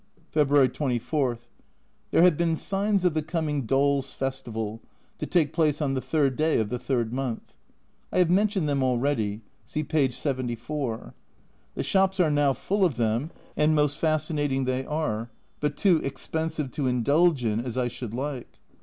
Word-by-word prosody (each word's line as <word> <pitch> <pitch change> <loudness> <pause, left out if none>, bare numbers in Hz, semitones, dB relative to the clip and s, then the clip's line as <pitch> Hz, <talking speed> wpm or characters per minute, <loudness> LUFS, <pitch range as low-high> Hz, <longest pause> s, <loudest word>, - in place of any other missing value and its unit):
February 145 -3 +4
24. 130 -1 -1 0.7
There 165 - +4
have 180 -3 +6
been 165 0 +1
signs 195 +2 0
of 175 - +3
the 155 - 0
coming 150 -5 -2
Dolls' 135 +1 +1
Festival, 115 -5 -4 0.4
to - - -3
take 160 -4 +2
place 155 -3 +2
on 140 -3 0
the 130 - -1
3rd 140 -4 +1
day 155 -2 +2
of 110 -2 -1
the 125 - -3
3rd 120 -4 -1
month. 125 -2 -4 0.6
I - - -1
have 180 -2 +4
mentioned 195 -3 +2
them 140 -2 +1
already 120 -5 0 0.2
(see 155 - -3
p. 150 -3 +2
74). 125 -1 -3 0.6
The - - -2
shops 190 0 +2
are 165 -4 +4
now 145 -2 +3
full 200 +8 -1
of 160 -10 +2
them, 115 +5 0 0.3
and 155 +1 +3
most 150 -1 +1
fascinating 145 -4 0
they 130 +1 -1
are, 120 -7 -2 0.3
but 145 0 -1
too 185 -5 +4
expensive 150 +1 -3
to 145 -4 -1
indulge 140 +3 +3
in 110 0 +1
as 125 0 -4
I 125 -1 +1
should 120 -2 -6
like. 135 -1 -5
140 Hz, 165 wpm, -26 LUFS, 125-155 Hz, 0.7 s, have